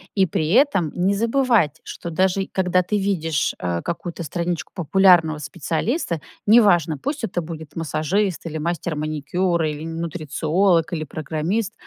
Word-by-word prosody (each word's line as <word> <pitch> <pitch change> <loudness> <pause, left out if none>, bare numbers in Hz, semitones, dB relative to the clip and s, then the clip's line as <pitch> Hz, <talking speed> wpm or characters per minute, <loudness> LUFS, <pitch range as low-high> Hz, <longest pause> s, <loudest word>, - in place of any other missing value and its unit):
И 195 -2 +4
при 160 -3 -1
этом 220 - +3
не 185 +3 +2
забывать, 230 - +2
что 170 - -7
даже 190 +3 +1
когда 185 -1 +2
ты 210 +4 -1
видишь, 165 -7 0
э, 85 -1 -2
какую-то 170 0 -4
страничку 170 +2 -3
популярного 175 -3 +4
специалиста- 160 - -2 0.3
неважно, 190 -8 +5
пусть 285 - -4
это 175 -4 -1
будет 160 -2 -8
массажист 165 +5 -1
или 160 -1 -4
мастер 170 +1 -2
маникюра, 155 +3 -1
или 150 0 -6
н 165 0 -5
нутрициолог, 165 +2 +1
или 155 -3 -3
программист. 160 +9 -2
170 Hz, 140 wpm, -22 LUFS, 155-195 Hz, 0.3 s, неважно